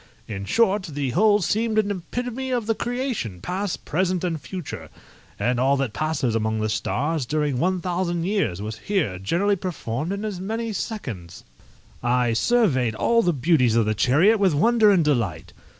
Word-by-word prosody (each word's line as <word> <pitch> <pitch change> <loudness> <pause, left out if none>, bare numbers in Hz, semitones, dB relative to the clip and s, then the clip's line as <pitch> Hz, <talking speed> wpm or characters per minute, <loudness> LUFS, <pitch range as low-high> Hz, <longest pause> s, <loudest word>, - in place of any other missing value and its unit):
In 100 -2 -5
short, 210 - +2
the 140 -3 -2
whole 210 - +4
seemed 220 +4 0
an 210 -1 +2
epitome 245 +7 -4
of 245 -3 -1
the 225 - +1
creation, 240 - -3
past, 185 - -3
present, 185 -1 0
and 165 -4 -2
future; 180 -6 -7 0.5
and 120 0 0
all 135 +2 +3
that 135 -5 -2
passes 155 -6 -1
among 110 0 0
the 110 0 -1
stars 145 +7 -1
during 145 0 -1
one 185 +2 +1
thousand 175 -1 -1
years 180 - -1
was 110 +1 -6
here 150 - -1
generally 180 - +1
performed 165 -4 -4
in 200 +2 -3
as 205 -4 -4
many 225 +3 -3
seconds. 115 - -6 0.6
I 120 -1 +1
surveyed 130 - +2
all 230 - +3
the 180 - +2
beauties 135 -5 +2
of 115 -2 +3
the 110 - +1
chariot 160 - +3
with 190 -6 +3
wonder 225 +6 +4
and 185 -6 +4
delight. 95 - -1
170 Hz, 170 wpm, -23 LUFS, 120-205 Hz, 0.6 s, whole